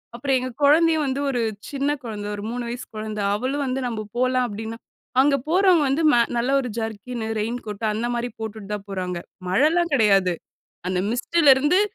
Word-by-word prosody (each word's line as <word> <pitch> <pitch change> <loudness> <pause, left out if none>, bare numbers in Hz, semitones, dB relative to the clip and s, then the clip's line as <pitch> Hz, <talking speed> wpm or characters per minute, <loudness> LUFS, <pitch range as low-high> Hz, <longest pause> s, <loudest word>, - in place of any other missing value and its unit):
அப்புறம் 265 +2 +1
எங்க 255 0 -4
கொழந்தையும் 315 +1 +5
வந்து 270 +1 -1
ஒரு 245 -3 0 0.3
சின்ன 280 0 -1
குழந்தை, 210 -3 -5
ஒரு 205 - -7
3 245 0 -3
வயசு 245 +1 -5
கொழந்த. 215 0 -4 0.2
அவளும் 270 +6 -1
வந்து 260 +1 -2
நம்ம 215 -3 -4
போலாம் 255 0 +2
அப்டின்னா. 220 +2 -6 0.4
அங்க 280 0 +4
போறவங்க 365 -3 +4
வந்து, 285 +5 +1
மேல 235 -1 +5
நல்ல 245 +3 +1
ஒரு 250 - -4
ஜர்க்கின்னு, 225 +1 -4
ரெயின் 235 +3 -2
கோட்டு 210 +1 -4
அந்த 230 +3 -2
மாரி 240 +1 -2
போட்டுட்டு 220 -2 -6
தான் 205 -1 -5
போறாங்க. 180 -2 -3 0.3
மழைலாம் 315 - +3
கெடையாது. 195 -7 +4 0.6
அந்த 185 -1 0
மிஸ்ட்டுலிருந்து 295 +5 +4
245 Hz, 170 wpm, -23 LUFS, 215-280 Hz, 0.6 s, கொழந்தையும்